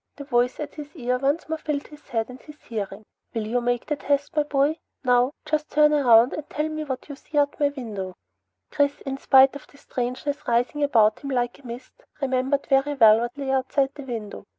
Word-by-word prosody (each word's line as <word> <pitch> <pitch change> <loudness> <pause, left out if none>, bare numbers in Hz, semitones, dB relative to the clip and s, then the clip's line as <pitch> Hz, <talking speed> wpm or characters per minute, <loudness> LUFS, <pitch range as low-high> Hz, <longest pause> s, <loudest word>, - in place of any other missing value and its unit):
The 285 - -8
voice 245 -2 +1
at 295 -1 -5
his 300 +1 -10
ear 250 -3 -1
once 280 +5 0
more 320 0 -3
filled 300 -2 -3
his 300 0 -15
head 225 -1 -1
and 250 +1 -11
his 300 -1 -14
hearing. 210 -2 -5 0.3
"You 220 0 -3
will 245 - +2
make 245 0 -1
the 300 - -1
test, 285 +1 -1
my 300 - +4
boy. 290 +2 +1 0.2
Now. 250 0 +4 0.2
Just 305 0 -1
turn 300 0 +4
around, 245 -4 +5
and 300 -1 -6
tell 300 +1 -1
me 310 0 -4
what 265 -4 -5
you 290 - -7
see 295 +2 -7
out 285 0 +2
my 290 -1 +3
window." 210 -9 -6 0.6
Chris, 285 0 +1
in 270 0 -5
spite 270 0 +6
of 285 - -10
the 285 - -20
strangeness 255 +2 -4
rising 245 +5 +1
about 220 -7 +4
him 280 - -6
like 245 -1 -1
a 270 - -13
mist, 240 +2 -10 0.2
remembered 270 +1 0
very 275 +1 +2
well 220 -4 +7
what 240 +3 -4
lay 275 -1 -2
outside 270 +1 +1
the 285 - -9
window. 225 -7 -6
270 Hz, 220 wpm, -24 LUFS, 245-290 Hz, 0.6 s, well